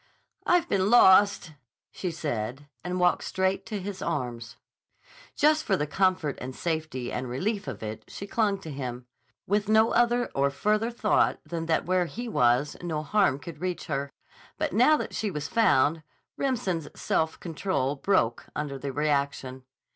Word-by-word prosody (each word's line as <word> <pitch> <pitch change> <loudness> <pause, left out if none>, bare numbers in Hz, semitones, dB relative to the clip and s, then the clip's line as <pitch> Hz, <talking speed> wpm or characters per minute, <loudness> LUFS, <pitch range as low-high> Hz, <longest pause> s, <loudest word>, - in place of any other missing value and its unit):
"I've 350 -1 +3
been 195 - +1
lost," 200 -6 +6 0.4
she 185 - -4
said, 145 -4 -4 0.2
and 180 +1 -3
walked 180 0 +3
straight 190 +1 -1
to 215 -3 -3
his 190 0 -6
arms. 120 -7 -3 0.8
Just 310 +1 +3
for 195 - +1
the 150 - -1
comfort 180 -2 0
and 130 +1 -6
safety 155 -7 -3
and 125 0 -3
relief 200 - -2
of - - -6
it 110 0 -6
she 200 - -7
clung 205 -1 +1
to 160 - -7
him, 125 -3 -5 0.4
with 205 +1 0
no 220 +1 +5
other 240 +1 +3
or 140 +1 +2
further 210 +11 0
thought 230 -3 +1
than 165 -1 -4
that 160 - +1
where 180 -1 +1
he 240 +7 -6
was 125 - +2
no 160 -3 -3
harm 200 -4 +2
could 150 +1 -10
reach 180 -1 -3
her. 140 -1 -3 0.5
But - - -2
now 255 +9 +5
that - - -5
she 215 - -1
was 150 -5 -4
found, 160 - +3 0.3
Remsen's 195 - -1
self 160 0 0
control 160 -5 -2
broke 135 - +1
under 140 -2 -4
the 140 +1 -4
reaction. 140 -3 -1
170 Hz, 160 wpm, -27 LUFS, 140-205 Hz, 0.8 s, lost